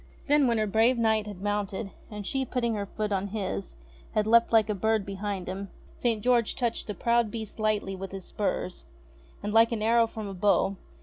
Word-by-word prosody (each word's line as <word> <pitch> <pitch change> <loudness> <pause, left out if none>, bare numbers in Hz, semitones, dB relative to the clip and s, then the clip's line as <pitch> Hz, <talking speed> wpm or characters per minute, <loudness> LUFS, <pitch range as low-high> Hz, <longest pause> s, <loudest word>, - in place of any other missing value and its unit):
Then, 290 -2 +4
when 235 -1 +2
her 215 - +2
brave 225 +4 +3
Knight 220 -2 +2
had 200 -2 -8
mounted, 205 -1 -2 0.2
and 210 -2 -7
she, 270 +5 0
putting 240 -2 -1
her 205 -2 -3
foot 210 +1 -3
on 195 0 0
his, 185 - -4 0.4
had 215 - +2
leapt 230 +1 +5
like 225 -2 +5
a 210 - 0
bird 220 +1 +1
behind 200 -1 -4
him, 195 +2 -5 0.3
St. 225 -4 0
George 240 -3 +2
touched 240 -3 -2
the 210 - -4
proud 235 -1 +2
beast 220 -1 -7
lightly 210 -3 0
with 190 0 -7
his 195 -1 -7
spurs, 195 -3 -2 0.6
and, 210 0 -2
like 225 +1 +6
an 220 -2 -1
arrow 230 +1 +4
from 220 -2 -6
a 195 - -5
bow. 195 +1 +2
215 Hz, 205 wpm, -28 LUFS, 200-230 Hz, 0.6 s, like